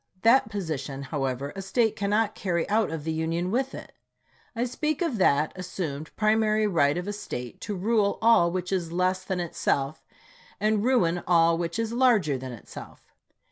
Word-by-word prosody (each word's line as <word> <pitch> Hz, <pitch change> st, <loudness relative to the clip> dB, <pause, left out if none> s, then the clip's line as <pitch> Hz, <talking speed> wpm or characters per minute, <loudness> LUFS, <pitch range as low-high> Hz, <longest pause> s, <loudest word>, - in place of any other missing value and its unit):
That 230 Hz, 0 st, +5 dB
position, 150 Hz, -9 st, -4 dB
however, 135 Hz, -1 st, -3 dB
a 195 Hz, -, -5 dB
State 220 Hz, +3 st, +1 dB
cannot 205 Hz, +1 st, +1 dB
carry 170 Hz, -4 st, -1 dB
out 220 Hz, +1 st, +2 dB
of 160 Hz, -2 st, -5 dB
the 160 Hz, -, -2 dB
Union 165 Hz, +3 st, -1 dB
with 265 Hz, +3 st, -1 dB
it. -, -, -9 dB, 0.6 s
I 235 Hz, -, 0 dB
speak 300 Hz, +4 st, -2 dB
of 265 Hz, -, -2 dB
that 150 Hz, -3 st, +3 dB
assumed 165 Hz, -5 st, -5 dB
primary 215 Hz, 0 st, +2 dB
right 165 Hz, -7 st, +2 dB
of 180 Hz, +2 st, -4 dB
a 205 Hz, -, -2 dB
State 125 Hz, -, -7 dB
to 205 Hz, -, -4 dB
rule 205 Hz, +1 st, +1 dB
all 225 Hz, -7 st, +5 dB
which 180 Hz, +1 st, -3 dB
is 175 Hz, -4 st, -1 dB
less 185 Hz, +2 st, 0 dB
than 190 Hz, -2 st, -3 dB
itself, 155 Hz, -4 st, -1 dB, 0.6 s
and 215 Hz, 0 st, +1 dB
ruin 180 Hz, -9 st, +2 dB
all 170 Hz, -1 st, +4 dB
which 170 Hz, +2 st, -3 dB
is 230 Hz, 0 st, -2 dB
larger 230 Hz, -, +3 dB
than 130 Hz, 0 st, -6 dB
itself. 115 Hz, -, -12 dB
185 Hz, 175 wpm, -26 LUFS, 160-215 Hz, 0.6 s, That